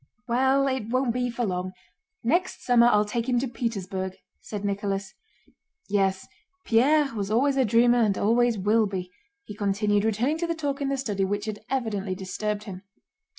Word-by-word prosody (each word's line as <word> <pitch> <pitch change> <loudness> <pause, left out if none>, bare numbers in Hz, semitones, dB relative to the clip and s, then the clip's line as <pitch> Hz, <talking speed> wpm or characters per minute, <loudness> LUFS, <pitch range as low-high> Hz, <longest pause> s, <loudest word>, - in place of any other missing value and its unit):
"Well 265 +3 +3
it 260 -5 -2
won't 255 -1 +1
be 245 0 -1
for 240 0 -2
long. 185 -1 -3 0.5
Next 345 +10 0
summer 240 -1 +5
I'll 210 -3 +4
take 230 +4 -2
him 245 - +2
to 260 +3 0
Petersburg," 195 -6 -3 0.2
said 205 -1 -6
Nicholas. 200 -1 -2 0.8
"Yes, 195 -2 +1 0.4
Pierre 280 +6 +4
always 205 -3 -4
was 280 +1 +2
a 265 - +4
dreamer 240 +2 +4
and 205 -4 +2
always 235 +2 +2
will 210 +3 +2
be," 185 -2 -5 0.3
he 210 - -9
continued, 205 0 +1
returning 235 +8 0
to 340 - -1
the 335 - -1
talk 285 -3 -3
in 275 - 0
the 275 - 0
study 210 -7 -1
which 205 +2 -1
had 215 -1 -4
evidently 210 -7 -2
disturbed 205 +2 -3
him. 190 -4 -8
220 Hz, 175 wpm, -26 LUFS, 200-250 Hz, 0.8 s, summer